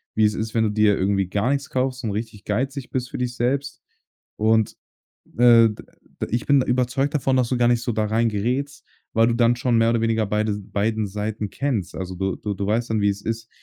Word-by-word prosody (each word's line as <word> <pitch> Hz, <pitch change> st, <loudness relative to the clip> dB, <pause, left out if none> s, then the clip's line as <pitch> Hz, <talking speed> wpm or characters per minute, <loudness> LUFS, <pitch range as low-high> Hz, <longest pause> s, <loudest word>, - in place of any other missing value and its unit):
wie 110 Hz, -, +4 dB
es 105 Hz, -, +2 dB
ist, 110 Hz, 0 st, -4 dB
wenn 115 Hz, -, +2 dB
du -, -, +1 dB
dir 105 Hz, -1 st, +3 dB
irgendwie 95 Hz, 0 st, +1 dB
gar 100 Hz, +6 st, 0 dB
nix 140 Hz, 0 st, -2 dB
kaufst 130 Hz, 0 st, -1 dB
und 110 Hz, -, -1 dB
richtig 105 Hz, 0 st, -5 dB
geizig 130 Hz, +5 st, -2 dB
bist 125 Hz, -1 st, -2 dB
für -, -, -6 dB
dich 125 Hz, -1 st, -3 dB
selbst. 140 Hz, +4 st, -1 dB, 0.5 s
Und, 110 Hz, 0 st, +2 dB, 0.6 s
äh, 120 Hz, -2 st, +7 dB
d 105 Hz, -, -5 dB, 0.5 s
de -, -, -2 dB
ich 120 Hz, +2 st, -1 dB
bin 140 Hz, -2 st, +4 dB
überzeugt 125 Hz, +3 st, 0 dB
davon, 135 Hz, -2 st, +1 dB
dass 125 Hz, -2 st, +2 dB
du 125 Hz, -, 0 dB
gar 120 Hz, 0 st, +3 dB
nicht 120 Hz, -1 st, +2 dB
so 120 Hz, -, -2 dB
da 110 Hz, 0 st, 0 dB
rein 115 Hz, +2 st, +1 dB
gerätst, 125 Hz, +7 st, -2 dB, 0.3 s
weil 115 Hz, +1 st, +4 dB
du 120 Hz, -, +1 dB
dann 120 Hz, 0 st, +3 dB
schon 120 Hz, 0 st, +1 dB
mehr 115 Hz, 0 st, +3 dB
oder 115 Hz, -1 st, +1 dB
weniger 115 Hz, -1 st, +1 dB
beide 105 Hz, +1 st, 0 dB
beiden 105 Hz, +2 st, -1 dB
Seiten 105 Hz, +1 st, -4 dB
kennst. 115 Hz, -11 st, -2 dB
Also, 95 Hz, 0 st, -5 dB
du 95 Hz, +1 st, -2 dB
du 105 Hz, -1 st, -4 dB
du 100 Hz, -, -4 dB
weißt 115 Hz, +3 st, 0 dB
dann, 110 Hz, -1 st, +1 dB
wie 100 Hz, -, +3 dB
es 100 Hz, 0 st, -5 dB
ist, 115 Hz, 0 st, -4 dB
115 Hz, 235 wpm, -23 LUFS, 105-125 Hz, 0.6 s, äh